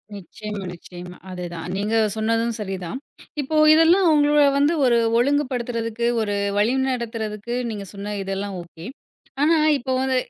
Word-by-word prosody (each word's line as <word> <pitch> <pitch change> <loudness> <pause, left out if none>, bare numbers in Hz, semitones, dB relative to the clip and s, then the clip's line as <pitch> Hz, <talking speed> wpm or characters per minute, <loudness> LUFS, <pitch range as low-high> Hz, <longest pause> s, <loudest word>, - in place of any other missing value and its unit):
நிச்சயமா, 205 +1 -7
நிச்சயமா. 180 +1 -11
அது 180 -1 -6
தான் 165 0 -6
நீங்க 210 +3 -1 0.2
சொன்னதும் 230 +1 0
சரி 195 -2 -3
தான். 210 - -5 0.4
இப்போ 300 +3 -4 0.2
இதெல்லாம் 335 +3 +5
உங்களை 295 -1 +4
வந்து 290 +4 +3
1 240 -1 +4 0.2
ஒழுங்கு 285 +4 +2
படுத்துறதுக்கு 235 -2 -3 0.2
1 205 -1 -2 0.2
வழி 225 +5 +2 0.2
நடத்துறதுக்கு 230 -2 -4 0.2
நீங்கச் 200 -3 -6
சொன்ன 205 +1 -5
இதெல்லாம் 195 0 -4
ஓகே. 170 0 -13 0.6
ஆனா 320 +2 +4 0.2
இப்போ 265 -1 -3
வந்து 265 0 0
225 Hz, 145 wpm, -22 LUFS, 200-265 Hz, 0.6 s, இதெல்லாம்